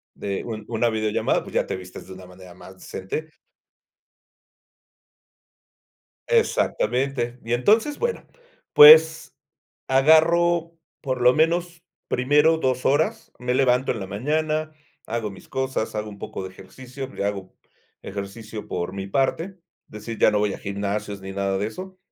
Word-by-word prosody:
de 100 -1 -4
un 110 -3 -6
una 120 0 0
videollamada, 110 -1 0
pues, - - -12
ya - - +2
te - - -4
vistes 90 0 -11
de 95 - -9
una 95 0 -12
manera 90 0 -14
más 95 +1 -14
decente. 125 +12 -6 3.0
Exactamente. 125 - 0
Y 115 +1 -2
entonces, 220 - +2
bueno, 475 0 -2 0.5
pues, 455 +1 +8 0.5
agarro 165 +4 +3 0.3
por 130 -3 -3
lo 125 +1 +6
menos, 170 +2 0 0.2
primero 150 +5 +3
2 130 -4 -1
horas. 145 +4 0
Me 125 0 -1
levanto 130 -1 +2
en 110 - -4
la 95 - -6
mañana, 155 +8 -1 0.4
hago 110 -2 -3
mis 95 - -14
cosas, 130 -4 -3
hago 105 0 -3
un 100 - -12
poco 95 - -6
de 95 - -6
ejercicio, 130 +8 -10
le 100 - -5
hago 100 -2 -4 0.5
ejercicio 105 +2 -7
por 90 +1 -4
mi 95 0 -5
parte, 135 +9 0
es 190 -2 -13 0.3
decir, 105 +2 -7
ya - - +5
no 105 - +1
voy 105 -1 0
a - - -7
gimnasios 100 0 -4
ni 95 0 -7
nada 100 -1 -1
de 105 - -1
eso, 185 +10 -9
120 Hz, 150 wpm, -23 LUFS, 100-155 Hz, 3.0 s, pues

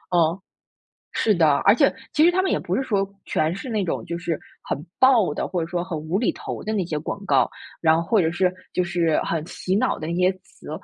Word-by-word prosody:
嗯， 165 +1 +3 0.7
是 215 - +2
的， 155 -4 +4
而 200 - +8
且 275 +2 +4 0.2
其 305 - +4
实 345 - +6
它 370 - +2
们 380 - 0
也 - - +1
不 - - -2
是 270 - 0
说 200 -6 +1 0.2
全 155 +2 0
是 255 - -7
那 215 -4 0
种 175 - -3
就 170 0 -4
是 170 -2 -2 0.2
很 - - -2 0.2
爆 240 - +5
的， - - -2
或 180 - -2
者 165 - -3
说 175 0 -2
很 175 -3 -4
无 160 +5 -2
厘 235 - +2
头 - - -7
的 215 - -3
那 195 -4 0
些 160 -3 -3
广 200 +6 -5
告， - - +3 0.3
然 160 -1 +5
后 165 0 -3
或 215 -5 +4
者 160 0 +1
是， 180 +1 +1 0.2
就 180 - +1
是 175 -3 +1
很 160 -1 -2
洗 185 +1 -2
脑 205 - +1
的 155 - -5
那 170 - -2
些 180 +1 +3
词。 - - -15
180 Hz, 265 characters per minute, -23 LUFS, 165-205 Hz, 0.7 s, 而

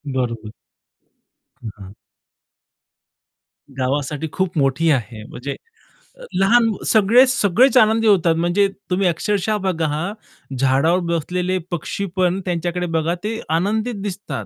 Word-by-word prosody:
बरोबर. 115 -4 -3 1.1
हं, 115 - -4
हां. 95 -1 -11 1.8
गावासाठी 140 +3 -2
खूप 185 -2 -2
मोठी 145 +3 +2
आहे. 115 -5 -2
म्हणजे 135 +5 -6 0.8
लहान 225 +4 +4 0.2
सगळे, 225 +4 +5
सगळेच 255 +3 +3
आनंदी 225 -1 +4
होतात, 175 -5 +4
म्हणजे 175 +4 +2 0.2
तुम्ही 185 +1 +1
अक्षरशः 205 +5 0
बघा 185 -5 -1
हां, 175 +7 -3 0.4
झाडावर 135 +7 +2 0.2
बसलेले 180 +3 -1
पक्षीपण 180 +2 -1
त्यांच्याकडे 175 0 -2
बघा 165 +2 0
ते 225 +1 -3 0.2
आनंदित 215 +6 -1
दिसतात. 180 - -5
175 Hz, 110 wpm, -20 LUFS, 145-205 Hz, 1.8 s, सगळे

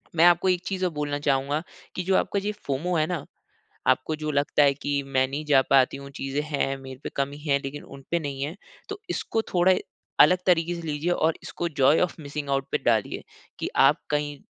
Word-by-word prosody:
मैं 165 +1 +6
आपको 175 +2 +5
एक 180 -1 +2
चीज़ 190 -1 -2
और 180 - 0
बोलना 145 -1 -2
चाहूँगा 145 +1 0 0.3
कि 180 - -2
जो 190 +1 +2
आपका 200 - 0
जो 195 - -8
ये - - +1
फोमो 155 +6 -1
है 155 - +3
ना, 175 -5 -3 0.6
आपको 155 +4 +2
जो 155 - -1
लगता 145 +1 +2
है 140 -1 +5
कि 145 0 -2
मैं 130 -1 +1
नहीं 145 +3 -5
जा 140 -3 +5
पाती 135 0 +4
हूँ, 140 0 -10
चीज़े 135 +1 -3
हैं 140 -2 -1
मेरे 130 -1 -10
पे - - -4
कमी 140 +1 -2
है, 145 -2 +1
लेकिन 135 +2 -6
उन 135 0 -12
पे 170 - +2
नहीं 140 -3 -5
हैं, 150 +4 -4 0.3
तो 410 0 -5
इसको 225 - -1
थोड़ा 185 +1 +5 0.5
अलग 180 +4 +7
तरीके 175 -1 +2
से 170 - -6
लीजिए 150 +4 -1
और 160 -2 +2
इसको 175 - -3
जॉय 140 +4 +5
ओफ 180 - 0
मिसिंग 145 -1 -6
आउट 135 0 0
पे - - +2
डालिए, 110 -3 +1 0.4
कि - - -2
आप - - +5
कहीं 145 -1 -1
145 Hz, 225 wpm, -25 LUFS, 140-170 Hz, 0.6 s, अलग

